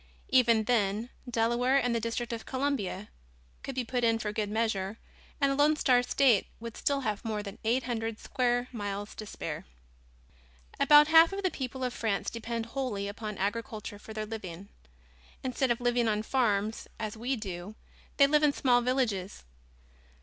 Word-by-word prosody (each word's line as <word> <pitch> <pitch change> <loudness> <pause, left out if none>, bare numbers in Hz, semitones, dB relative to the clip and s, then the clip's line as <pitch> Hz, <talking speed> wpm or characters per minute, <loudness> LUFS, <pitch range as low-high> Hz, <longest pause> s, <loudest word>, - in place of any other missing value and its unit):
Even 235 -4 +4
then, 215 0 0 0.2
Delaware 240 +3 +2
and 245 -3 +1
the 230 - +1
District 230 +1 -3
of 230 - -6
Columbia 260 -8 -2 0.5
could 270 - -6
be 255 - 0
put 245 +1 -2
in 230 -1 +3
for 215 -2 -3
good 210 -1 -1
measure 210 -2 -1 0.4
and 280 -1 +3
the - - 0
Lone 295 +2 +4
Star 255 -4 +4
State 245 -3 +3
would 230 -1 -7
still 280 -1 0
have 215 -5 -2
more 215 -2 -2
than 200 -1 -8
eight 240 +4 +1
hundred 225 -2 -3
square 245 0 0
miles 205 -3 -4
to 215 - -8
spare. - - -5 1.2
About 295 0 +7
half 325 +1 +7
of 395 0 -4
the 370 - +1
people 260 -1 -5
of 250 -1 -1
France 220 -5 -1
depend 230 0 -4
wholly 230 -5 -3
upon 210 0 -6
agriculture 210 0 -3
for 220 - -11
their 215 0 -4
living. 200 -4 -7 0.7
Instead 260 0 0
of 235 - +1
living 240 -1 +1
on 215 0 0
farms 220 -4 0
as 215 -1 -4
we 245 +4 -1
do 195 -2 -6 0.4
they 280 - +7
live 300 +1 +3
in 295 -2 +4
small 245 -3 +3
villages. 235 -7 -1
230 Hz, 170 wpm, -30 LUFS, 210-255 Hz, 1.2 s, About